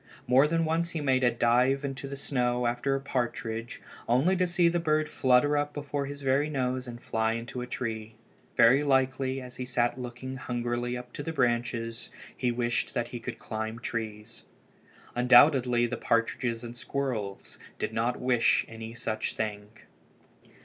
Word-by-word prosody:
More 130 +4 +5
than 165 +1 +1
once 165 +2 0
he 165 - -4
made 130 -3 +2
a 125 - +6
dive 125 +4 +2
into 135 0 -5
the 140 - -5
snow 125 -3 0
after 125 +3 0
a - - -1
partridge, 120 -3 -3 0.3
only 135 +11 +4
to 180 0 +2
see 175 0 +3
the 170 +1 +2
bird 155 -2 +1
flutter 130 +2 +3
up 145 0 -1
before 145 -1 -3
his 145 0 -7
very 135 +3 +2
nose 130 -2 -1
and 120 -1 -7
fly 110 -2 0
into 120 +2 -5
a 125 - -5
tree. 110 -3 -4 0.4
Very 135 +5 +6
likely, 130 -1 +1
as 125 -1 -10
he 125 - -3
sat 125 0 0
looking 125 +2 -6
hungrily 120 0 -2
up 125 0 -10
to - - -5
the 165 - -3
branches, 120 -4 -1 0.3
he 125 -2 0
wished 120 0 -1
that 120 0 -1
he 120 - -6
could - - -6
climb 110 +1 -4
trees. 110 -1 -5 0.7
Undoubtedly 125 0 +5
the 120 +1 -3
partridges 115 0 0
and 120 0 -7
the 120 - -13
squirrels 120 -10 -4 0.2
did - - -3
not 115 +2 0
wish 125 -2 +3
any 115 0 -8
such 110 -2 -3
thing. 105 -1 -3
125 Hz, 170 wpm, -28 LUFS, 120-135 Hz, 0.7 s, a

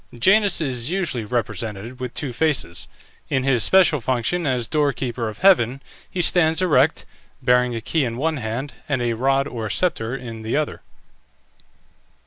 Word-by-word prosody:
Janus 195 - +3
is 130 -3 -2
usually 170 - -2
represented 115 0 -4
with 125 -1 -6
two 135 -4 -3
faces; 120 - -1 0.4
in 130 - 0
his 130 -4 +2
special 175 -3 +4
function 130 +8 -1
as 125 -4 0
door 145 -1 +1
keeper 120 -3 -3
of 105 - -9
heaven 135 -8 +4 0.3
he 180 - -1
stands 160 -2 +3
erect, 160 -4 +2 0.3
bearing 125 -1 +2
a 115 - -4
key 155 +6 0
in 115 -2 -3
one 155 +3 0
hand, 120 +3 -4 0.2
and 130 -4 0
a 120 -1 0
rod 135 +4 +1
or 115 -5 -5
sceptre 125 - 0
in 115 -4 -7
the 110 +5 -1
other. 155 -1 -2
130 Hz, 160 wpm, -22 LUFS, 115-155 Hz, 0.4 s, special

